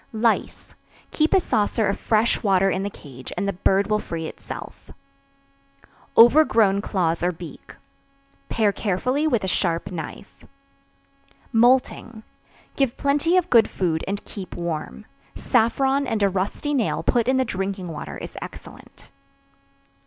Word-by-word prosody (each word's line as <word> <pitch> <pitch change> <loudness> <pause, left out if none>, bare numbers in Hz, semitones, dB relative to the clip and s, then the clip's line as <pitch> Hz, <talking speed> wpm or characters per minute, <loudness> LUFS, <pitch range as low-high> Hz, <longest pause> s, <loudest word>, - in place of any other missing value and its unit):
Lice. 225 +1 -1 0.4
Keep 310 0 +1
a - - +6
saucer 220 - 0
of 200 - -1
fresh 225 +1 +1
water 195 -2 +3
in 190 - -1
the 200 - -2
cage 130 -9 -12
and 200 - -1
the 200 - -1
bird 195 +2 +2
will 210 0 0
free 165 -5 -5
itself. - - -9 1.3
Overgrown 230 -6 +6
Claws 170 -6 -1
or 175 +1 +1
Beak. 170 -1 -11 0.7
Pare 215 -3 +2
carefully 250 +10 -1
with 240 -9 +1
a - - -1
sharp 170 -2 -1
knife. 170 +3 -8 1.1
Moulting. 235 -1 +2 0.5
Give 270 -4 0
plenty 295 +5 +2
of 360 -1 0
good 230 -3 +5
food 165 -4 -1
and 200 +1 -4
keep 190 -4 -8
warm. 155 - -5 0.3
Saffron 270 +4 +1
and 220 -3 0
a 200 - +4
rusty 195 +10 -2
nail 250 -6 0
put 240 -2 +1
in 260 0 +3
the 260 - +2
drinking 190 -3 -4
water 160 - -7
is - - -9
excellent. - - -12
210 Hz, 140 wpm, -23 LUFS, 185-245 Hz, 1.3 s, a